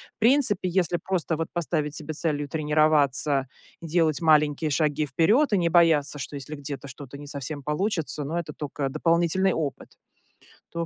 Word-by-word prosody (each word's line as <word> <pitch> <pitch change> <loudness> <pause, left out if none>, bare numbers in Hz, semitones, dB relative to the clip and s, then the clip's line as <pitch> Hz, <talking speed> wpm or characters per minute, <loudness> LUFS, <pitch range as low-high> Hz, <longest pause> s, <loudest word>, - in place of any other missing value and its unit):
в - - -65
принципе, 230 -5 +3
если 175 -1 +1
просто 170 -3 -2
вот 165 0 -2
поставить 155 -3 -1
себе 155 0 -6
целью 145 -2 -1
тренироваться, 150 -3 +2 0.3
делать 160 -3 +1
маленькие 150 -1 +3
шаги 150 +1 +1
вперед 205 - +2
и - - +4
не 170 -1 +1
бояться, 160 -4 +3
что 145 +1 -6
если 140 +2 -7
где-то 140 -1 -7
что-то 140 0 -10
не 145 - -10
совсем 145 +1 -5
получится, 155 0 -2
но 160 +5 -2
это 155 -3 -6
токо 140 -1 -4
дополнительный 170 +5 +1
опыт, 150 -4 -4 0.8
то, 170 0 -2
155 Hz, 160 wpm, -25 LUFS, 145-170 Hz, 0.8 s, и